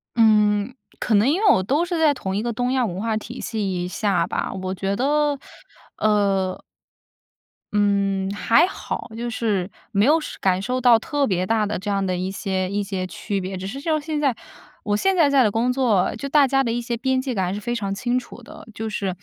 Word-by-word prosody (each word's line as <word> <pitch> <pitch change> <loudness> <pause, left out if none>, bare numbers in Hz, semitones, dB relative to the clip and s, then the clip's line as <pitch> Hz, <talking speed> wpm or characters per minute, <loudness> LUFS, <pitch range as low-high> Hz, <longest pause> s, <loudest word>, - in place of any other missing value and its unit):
嗯， 210 0 +3 0.3
可 225 - +1
能 210 +6 +4
因 340 +7 +1
为 435 - +3
我 - - +3
都 285 - +1
是 350 -1 -2
在 310 -2 +4
同 190 -8 -4
一 205 - 0
个 235 +1 -2
东 245 +2 -1
亚 260 -2 +2
文 185 -3 -4
化 225 0 -1
体 240 +3 -8
系 190 -6 -2
下 180 -2 0
吧。 - - -2
我 185 -1 -4
觉 195 +1 -2
得 290 +4 +1 0.6
呃。 200 -3 +1 1.1
嗯， 200 -2 +1
还 230 +7 +4
好。 370 - -5
就 240 +1 -4
是 210 -5 -1 0.2
没 205 -1 +3
有 305 +4 +5
是 310 - -8
感 185 -1 +1
受 250 +5 -2
到 240 -2 +6
特 285 +4 -1
别 185 -2 0
大 220 +1 +1
的 210 +1 -2
这 205 +3 -5
样 195 -1 0
的 185 -1 -1
一 185 +1 -3
些 190 -1 -2
一 205 +1 -1
些 195 -2 -3
区 200 +2 -4
别， 190 +1 -5
只 185 +1 -5
是 270 +8 -6
就 320 +3 -2
像 310 -1 +1
现 305 0 -3
在， 275 -5 +1 0.5
我 205 0 0
现 385 - +2
在 325 -5 +4
在 275 -2 +4
的 215 - +2
工 230 +4 +1
作， 235 -9 +1
就 255 +5 -5
大 285 -1 +5
家 270 +1 +2
的 235 - -1
一 240 +1 -1
些 235 0 -3
边 260 +1 0
界 260 -2 -3
感 190 -2 0
还 180 - -2
是 205 - -4
非 240 +2 -2
常 200 -4 -2
清 240 +5 -1
楚 250 - -7
的。 235 - -13
就 220 +1 -4
是， 200 -2 -2
220 Hz, 245 characters per minute, -22 LUFS, 195-255 Hz, 1.1 s, 到